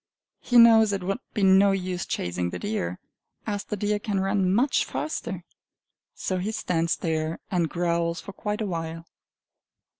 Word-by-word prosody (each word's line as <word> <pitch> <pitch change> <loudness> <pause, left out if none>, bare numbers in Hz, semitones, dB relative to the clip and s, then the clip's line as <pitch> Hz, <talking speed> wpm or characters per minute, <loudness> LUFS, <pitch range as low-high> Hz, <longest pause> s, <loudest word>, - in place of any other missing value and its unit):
He 245 - +1
knows 225 -2 +7
it 195 -2 -2
would 195 +5 -2 0.2
be 210 - 0
no 195 +1 +6
use 185 -1 -3
chasing 90 0 -2
the - - -5
deer, 205 - -3 0.5
as 205 -2 -2
the 210 - -4
deer 205 +1 0
can 205 -2 -2
run 195 -1 +1
much 250 +8 +2
faster. 155 +6 -4 0.7
So 185 -1 -2
he 200 +4 -2
stands 170 -5 0
there, 160 0 -2
and 175 -4 +1
growls 170 0 0
for 200 - -9
quite 210 +2 -3
a - - 0
while. 165 -2 -4
190 Hz, 160 wpm, -26 LUFS, 170-205 Hz, 0.7 s, knows